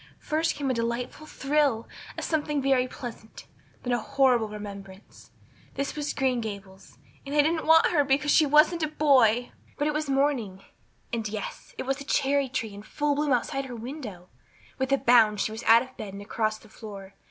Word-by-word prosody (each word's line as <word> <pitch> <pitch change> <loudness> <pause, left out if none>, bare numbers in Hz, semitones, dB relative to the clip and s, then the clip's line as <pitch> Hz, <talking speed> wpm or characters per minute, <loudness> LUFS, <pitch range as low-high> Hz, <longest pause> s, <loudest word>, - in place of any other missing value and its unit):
First 320 +2 -1
came 280 -2 -1
a - - +1
delightful 235 +5 -3
thrill, 275 -6 0 0.3
as - - -3
something 300 -2 0
very 265 -2 +2
pleasant; 235 -3 -9 0.4
then 245 - -1
a 240 - +1
horrible 245 -2 +2
remembrance. 200 -2 -10 0.5
This 275 0 -3
was 295 -1 -2
Green 255 -3 +1
Gables 200 -3 -9 0.3
and 280 +1 -5
they 295 - +6
didn't 320 +1 0
want 325 0 +7
her 300 -4 +3
because 280 +2 +1
she 310 - +5
wasn't 305 +4 +4
a 310 - +1
boy! 255 -6 +3 0.3
But 290 - 0
it 300 - 0
was 305 -1 -2
morning 265 -9 0 0.5
and, 225 -2 -2
yes, 215 -1 -7
it - - -3
was 270 +2 -2
a - - -5
cherry 280 -1 +1
tree 225 -4 -3
in 200 - -9
full 290 +7 -1
bloom 290 0 0
outside 270 +2 0
of - - -10
her 245 - -6
window. 230 - -8 0.5
With 265 +1 -1
a 275 - +5
bound 225 -5 +4
she 215 - 0
was 220 +1 -6
out 230 +2 +7
of 260 0 -15
bed 200 -3 -7
and 200 - -8
across 215 +1 -1
the 220 - -18
floor. 200 -3 -10
255 Hz, 200 wpm, -27 LUFS, 220-290 Hz, 0.5 s, want